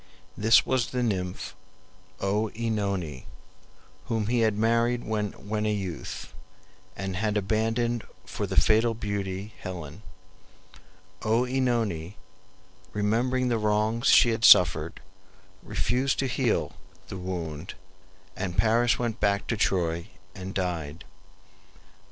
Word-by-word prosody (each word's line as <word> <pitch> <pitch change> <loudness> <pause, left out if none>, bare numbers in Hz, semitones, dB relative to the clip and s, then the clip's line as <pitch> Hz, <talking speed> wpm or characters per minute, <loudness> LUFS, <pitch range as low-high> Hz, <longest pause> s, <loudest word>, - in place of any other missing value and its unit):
This 110 +2 +5
was 130 -3 +1
the 125 -1 -1
nymph 95 -5 -2 0.7
OEnone, 100 - -1 0.8
whom 110 -2 -1
he 120 +2 +1
had 110 -2 +2
married 115 +2 +2
when 105 0 -3
a - - +1
youth, 95 -7 -5 0.6
and 95 0 -4
had 105 0 0
abandoned 115 +3 0 0.2
for - - -4
the - - +3
fatal 115 +1 +3
beauty 100 -2 -4
Helen. 90 -1 -7 1.2
OEnone, 115 -7 0 0.8
remembering 120 +5 +1
the 115 -2 +1
wrongs 105 +3 +1
she 120 - +7
had 115 0 -2
suffered, 80 -6 +6 0.6
refused 125 +6 0
to 135 - 0
heal 125 -2 0 0.4
the 95 - -5
wound, 85 -3 -5 0.6
and 90 -2 -4
Paris 120 +2 +3
went 120 -2 -2
back 100 -1 +1
to - - -1
Troy 85 -5 0 0.3
and 95 0 -7
died. 85 -4 -3
105 Hz, 110 wpm, -27 LUFS, 95-115 Hz, 1.2 s, she